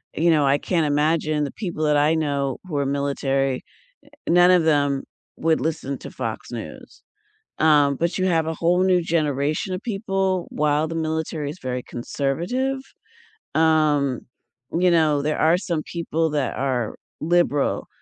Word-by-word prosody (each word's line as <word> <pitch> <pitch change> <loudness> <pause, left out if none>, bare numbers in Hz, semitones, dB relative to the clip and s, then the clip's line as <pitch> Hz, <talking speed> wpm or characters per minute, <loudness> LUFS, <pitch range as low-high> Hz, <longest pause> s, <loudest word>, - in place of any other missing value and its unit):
you 170 +2 +3
know, 150 -3 +3
I 140 +1 +4
can't 165 +1 0
imagine 150 +1 +1
the - - -5
people 175 -7 -4
that 150 -1 +3
I 150 +3 +3
know 140 -4 -1
who 150 -5 -3
are 140 - +1
military, 135 -1 -1 0.4
eh, - - -21 0.2
none 175 +1 +6
of 175 -3 +4
them 145 -3 +2 0.3
would 160 0 +1
listen 145 -4 -3
to - - -9
Fox - - -5
News, - - -9 0.6
um, 145 -3 +4
but 170 +5 -1
you 185 - 0
have 165 -2 +1
a 160 - -1
whole 175 +3 +2
new 185 -1 +4
generation 155 +1 -1
of 185 - -6
people 195 -4 -1
while 150 +1 +1
the 165 - -5
military 160 -2 -2
is 165 - -8
very 125 -1 -3
conservative, 175 - -2 0.8
um, 155 -5 +2 0.6
you 180 0 +4
know, 155 -4 +3
there 150 +1 -1
are 165 +2 +4
some 170 -5 -3
people 165 -2 -1
that 145 -3 -1
are 130 -4 -1 0.3
liberal, 165 -3 +1
155 Hz, 160 wpm, -23 LUFS, 145-170 Hz, 0.8 s, none